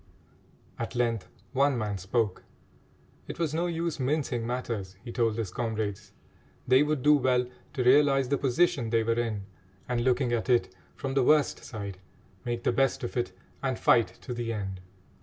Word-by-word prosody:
At - - -4
length 115 -4 0 0.3
one 140 0 +3
man 105 -3 -2
spoke. 100 +1 -1 0.8
It - - -6
was 165 -3 -1
no 170 +2 0
use 170 -2 -2
mincing 130 -4 0
matters, 115 -6 -3
he 120 - -7
told 115 -2 +1
his 110 -6 -3
comrades. 110 -4 -3 0.6
They 130 +2 +6
would 150 -3 0
do 150 - +7
well 125 -2 +2 0.3
to 130 -3 -1
realise 135 +1 +5
the 140 - +1
position 130 -2 +2
they 115 0 +2
were 115 +1 +2
in, 110 -4 -2 0.4
and, 120 -1 0
looking 125 -1 +2
at 120 +3 -1
it 120 -6 +3 0.2
from 135 -1 -4
the 135 - +3
worst 150 +2 +3
side, 100 -5 -6 0.5
make 120 -1 -2
the - - +3
best 135 +2 +1
of 120 - -4
it 120 -6 -1 0.3
and 130 -3 -1
fight 115 -2 +4
to 125 - -5
the 120 -1 -3
end. 95 -4 -4
120 Hz, 175 wpm, -28 LUFS, 115-135 Hz, 0.8 s, do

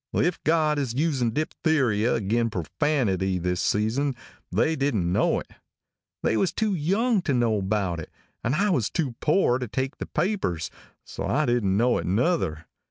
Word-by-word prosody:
If 175 -1 +1
God 155 -2 +2
is 130 -4 -2
using 135 -5 +1
diphtheria 130 -5 +1
agin 115 +2 0
perfanity 95 - 0
this 90 +1 -1
season 125 +7 0 0.4
they 120 - +2
didn't 110 - 0
know - - +2
it. - - -11 0.7
They 110 - +2
was 190 - +2
too 215 -2 0
young 195 +7 +1
to 145 -6 0
know 115 -3 +2
about 95 -3 -1
it 80 - -8 0.3
and 125 +5 +1
I 200 +4 +2
was 125 - +1
too 150 -8 -1
poor 150 -6 +2
to 125 - -3
take 130 +5 -3
the - - -4
papers, 155 - -1 0.3
so - - -5
I 150 +4 +1
didn't 115 -6 +1
know 120 +3 +3
it - - -4
nuther. 95 - 0
125 Hz, 165 wpm, -25 LUFS, 105-155 Hz, 0.7 s, know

